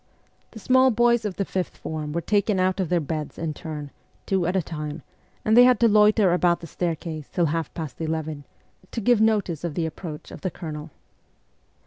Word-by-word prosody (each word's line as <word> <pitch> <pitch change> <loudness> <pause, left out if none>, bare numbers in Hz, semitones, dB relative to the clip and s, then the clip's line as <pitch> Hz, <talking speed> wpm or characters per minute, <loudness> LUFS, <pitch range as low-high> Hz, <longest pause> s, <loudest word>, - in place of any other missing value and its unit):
The - - -13
small 260 +4 +4
boys 240 -1 +3
of 200 -3 -3
the 200 - -1
fifth 185 -1 -3
form 155 -1 -5
were 170 +3 -1
taken 205 +2 +1
out 185 +1 +1
of 185 -4 -1
their 175 - +2
beds 155 0 -4
in 165 -2 -3
turn, 150 -2 -7 0.3
two 190 -3 +1
at 180 - -1
a 190 - +3
time, 150 -1 -6 0.4
and 220 - +4
they 245 - +9
had 250 0 +5
to 235 - +7
loiter 210 -3 +5
about 175 -1 +2
the - - -9
stair 170 +1 -2
case 155 -2 -7
till 175 - +1
half 165 -2 -2
past 160 -2 -6
eleven, 155 -2 -3 0.5
to - - -2
give 230 0 +3
notice 205 -8 +1
of 170 -4 -3
the 165 - 0
approach 160 -1 -7
of - - -10
the 185 - -1
Colonel. 155 -2 -7
175 Hz, 205 wpm, -24 LUFS, 155-210 Hz, 0.5 s, they